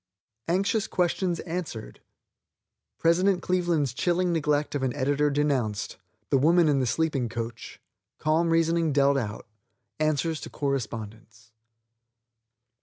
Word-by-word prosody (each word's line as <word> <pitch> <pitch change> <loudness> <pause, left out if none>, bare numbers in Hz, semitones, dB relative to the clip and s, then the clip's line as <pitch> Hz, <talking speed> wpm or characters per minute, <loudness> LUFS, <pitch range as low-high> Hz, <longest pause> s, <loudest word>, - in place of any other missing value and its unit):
ANXIOUS 195 +5 +1
QUESTIONS 180 0 0
ANSWERED. 165 -10 -6 1.0
PRESIDENT 180 +2 +2
CLEVELAND'S 175 -7 +1
CHILLING 175 +5 +1
NEGLECT 150 -2 0
OF 145 - -1
AN 130 -2 -1
EDITOR 145 +2 +1
DENOUNCED 135 -8 -1 0.3
THE 135 - +4
WOMAN 165 +4 +4
IN 145 -2 +3
THE 130 - 0
SLEEPING 140 -3 0
COACH 115 0 -6 0.4
CALM 160 +2 +1
REASONING 165 -1 +2
DEALT 140 0 +4
OUT. 110 -3 -5 0.5
ANSWERS 155 +1 0
TO - - -7
CORRESPONDENTS. 115 -4 -5
150 Hz, 110 wpm, -26 LUFS, 130-170 Hz, 1.0 s, THE